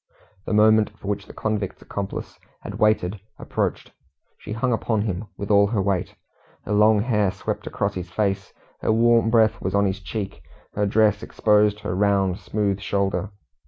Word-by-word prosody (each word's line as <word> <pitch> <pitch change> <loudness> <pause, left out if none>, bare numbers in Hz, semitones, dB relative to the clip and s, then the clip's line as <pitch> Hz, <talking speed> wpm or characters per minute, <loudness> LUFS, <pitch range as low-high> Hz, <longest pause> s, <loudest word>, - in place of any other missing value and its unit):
The - - -1
moment 110 0 +5
for - - -10
which 100 -1 -3
the - - -11
convict's 105 -3 -2
accomplice 100 -1 -6 0.2
had - - -7
waited 105 -2 +2 0.2
approached. - - -3 0.5
She 105 - -7
hung 120 +2 0
upon 110 -2 0
him 100 -1 -3
with 100 +1 -4
all 100 0 +5
her 105 0 -1
weight. 95 -2 -1 0.5
Her - - -5
long 105 0 +5
hair 105 -4 +1
swept 95 +1 -5
across 100 0 -1
his 90 -2 -6
face, 100 +1 -1 0.3
her - - +1
warm 115 0 +4
breath 110 -2 +3
was 95 +1 -2
on 100 0 +3
his 95 0 -1
cheek, 100 -9 -5 0.3
her 105 0 0
dress 105 0 +3
exposed 105 -2 +2
her 90 - -3
round, 95 -1 +1
smooth 100 0 -1
shoulder. 100 0 -1
105 Hz, 170 wpm, -23 LUFS, 100-110 Hz, 0.5 s, moment